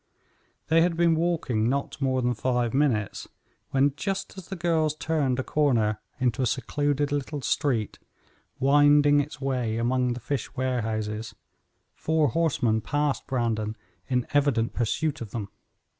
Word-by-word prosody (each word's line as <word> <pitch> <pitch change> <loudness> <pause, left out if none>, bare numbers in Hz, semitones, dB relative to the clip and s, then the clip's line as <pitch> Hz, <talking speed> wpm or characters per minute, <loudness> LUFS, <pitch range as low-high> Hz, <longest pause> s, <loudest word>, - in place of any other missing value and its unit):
They 165 +1 +5
had 170 -1 +1
been 170 -1 +4
walking 155 -9 0
not 140 +1 -2
more 130 -1 +1
than 125 0 +2
five 120 0 0
minutes, 130 -8 0 0.4
when, 135 +1 +2
just 195 +5 -3
as 190 -2 -10
the 195 - -5
girls 160 -3 +1
turned 150 -5 0
a 130 - -1
corner 115 -9 +1 0.2
into 125 -2 0
a 125 - +2
secluded 145 +3 0
little 145 0 -2
street, 125 -9 0 0.6
winding 145 +1 +5
its 145 0 -3
way 125 -5 -1
among 125 +1 +1
the 120 - -6
fish 140 +4 -4
warehouses, 110 -4 -2 0.6
four 160 -2 +1
horsemen 130 -9 +1
passed 145 +3 -1
Brandon 115 -4 -1 0.3
in 125 -2 0
evident 140 -6 +2
pursuit 140 +6 -1
of 115 - -5
them. 100 -2 -5
135 Hz, 145 wpm, -26 LUFS, 115-150 Hz, 0.6 s, They